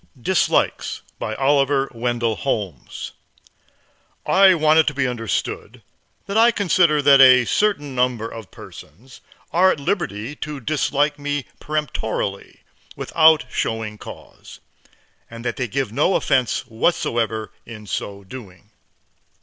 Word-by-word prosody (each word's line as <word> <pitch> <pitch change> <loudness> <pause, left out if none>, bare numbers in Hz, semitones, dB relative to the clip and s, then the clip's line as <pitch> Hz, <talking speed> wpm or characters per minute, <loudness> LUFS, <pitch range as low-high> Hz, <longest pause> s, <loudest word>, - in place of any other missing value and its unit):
DISLIKES 185 +8 0 0.2
BY 110 - -4
OLIVER 135 0 +1
WENDELL 120 -1 -1
HOLMES 100 - -4 1.1
I 190 -1 +5
want 155 0 +4
it 160 - +3
to 150 - -1
be 135 -1 0
understood 115 -3 -4 0.4
that 200 - -5
I 230 +1 +6
consider 175 -8 +2
that 140 -1 +7
a 130 -2 +7
certain 145 - 0
number 125 -3 0
of 115 -3 -10
persons 120 - -14 0.3
are 185 +2 +5
at - - -3
liberty 140 - -3
to 150 -1 -6
dislike 145 +2 0
me 145 -1 -3
peremptorily, 120 -9 -4 0.3
without 160 -1 +4
showing 110 -1 -3
cause, - - -12 0.7
and 115 +1 -10
that 120 - -3
they 125 - -2
give 130 0 -3
no 150 - +1
offense 130 -4 +1
whatever 115 -4 -1 0.2
in 110 -2 -10
so 100 +1 -5
doing. 100 -2 -12
130 Hz, 125 wpm, -21 LUFS, 115-150 Hz, 1.1 s, that